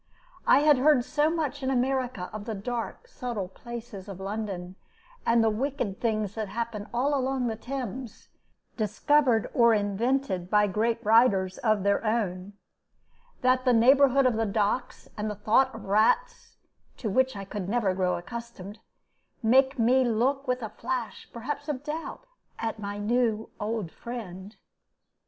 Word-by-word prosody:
I - - +6
had 295 -3 +5
heard 280 -2 +4
so 300 +1 +2
much 300 -4 -2
in 260 - -1
America 255 -6 -1
of 215 -1 -6
the 225 - -4
dark, 240 - -5
subtle 245 - -4
places 235 -2 -9
of 190 -2 -8
London, 195 -3 -5 0.5
and 230 0 +4
the 225 - +4
wicked 245 -3 -3
things 215 -4 0
that 220 -1 -3
happen 220 -1 -4
all 260 +5 +1
along 265 -1 0
the 225 -2 -1
Thames, 250 0 -6 0.5
discovered 235 +2 +2
or 235 -2 +5
invented 205 -2 -1
by 210 0 +4
great 225 +3 -1
writers 205 -4 +4
of 215 -4 +1
their 200 +2 +2
own, 205 -4 -1 0.9
that 255 0 +3
the 250 -1 +3
neighborhood 270 +3 +5
of 245 -3 +2
the 225 - +1
docks 210 +4 -1
and 215 0 -2
the 210 - -4
thought 225 +6 +3
of 225 - -9
rats 215 +3 +1 0.4
(to 235 - -4
which 260 +5 +2
I 200 -1 -6
could 195 -1 -5
never 215 -4 +1
grow 185 -1 0
accustomed) 210 0 -8 0.6
made 265 +4 +4
me 250 +3 +4
look 255 +4 0
with 250 -1 -1
a 220 - -4
flash 240 -3 -5
perhaps 260 +6 -5
of 280 -2 -3
doubt 320 +10 -6 0.3
at 225 -1 -3
my 205 0 -5
new 225 0 0
old 210 -5 -3
friend. 210 -4 -8
230 Hz, 155 wpm, -27 LUFS, 205-255 Hz, 0.9 s, I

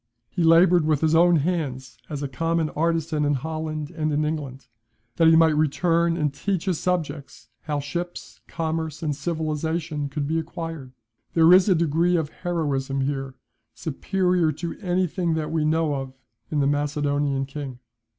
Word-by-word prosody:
He - - -2
laboured 170 +1 +6
with 155 -2 +1
his 160 0 +2
own 170 +1 +5
hands 135 -7 -2
as 145 -1 -4
a - - -1
common 165 +4 -1
artisan 160 -1 0
in 145 0 +2
Holland 155 +1 -4
and 155 -2 -2
in 150 +1 +1
England, 140 -4 -4 0.5
that 165 - +5
he 160 - +7
might 160 -1 +5
return 165 +3 +2
and 150 -4 0
teach 190 +4 -2
his 185 -5 0
subjects 155 -6 -3 0.2
how 150 -2 -1
ships, 175 +5 -6
commerce, 160 -1 -3
and 150 -2 -1
civilization 155 -1 -2
could 140 0 -3
be 160 +2 0
acquired. 160 -4 -6 0.4
There 165 +1 +7
is 185 +2 +6
a 185 - +5
degree 170 +2 +2
of 160 -3 0
heroism 140 -7 -2
here 135 -1 -3 0.4
superior 180 +2 0
to 165 +3 -5
anything 180 -3 0
that 155 -1 -2
we 160 -2 0
know 160 -1 +1
of 135 -1 -4 0.4
in 150 -2 0
the - - +2
Macedonian 145 -1 0
king. 135 -2 -7
155 Hz, 160 wpm, -24 LUFS, 145-165 Hz, 0.5 s, he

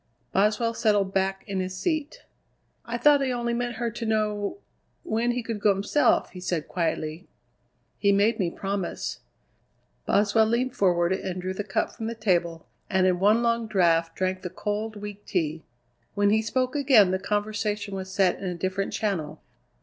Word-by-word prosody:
Boswell 215 +4 +2
settled 205 -4 +1
back 195 0 0
in 195 -1 -3
his 185 0 -3
seat. 310 - -2 0.6
"I 235 0 -3
thought 285 +3 +5
he 265 -2 0
only 240 -1 -1
meant 240 0 -2
her 235 0 -2
to 235 - -6
know 215 - 0 0.5
when 240 -8 0
he 240 0 -1
could 225 -2 -4
go 200 -1 +3
himself," 200 +9 +2
he 180 - -9
said 175 -4 -2
quietly. 160 0 -2 0.7
"He 200 - +3
made 210 +3 +3
me 180 -3 +1
promise." 195 +1 -4 0.9
Boswell 210 +2 +3
leaned 245 +3 0
forward 175 -2 +2
and 185 -1 -3
drew 185 +1 -3
the 205 - -4
cup 195 -1 -1
from 220 - -6
the 230 - -4
table, 175 -6 0 0.2
and 190 -1 +2
in 180 -1 +2
one 215 +5 +4
long 230 -1 +1
draught 165 -5 +2
drank 185 +1 -1
the 180 - -5
cold, 210 +4 -3
weak 205 0 -8
tea. 160 -3 -1 0.5
When 205 0 +3
he 220 +1 +3
spoke 255 +4 -1
again 260 -10 +5
the 190 - 0
conversation 210 0 -2
was 190 -1 -5
set 190 -2 +2
in - - -6
a 180 -1 -2
different 190 +3 -2
channel. 180 -9 -2
205 Hz, 175 wpm, -26 LUFS, 185-225 Hz, 0.9 s, thought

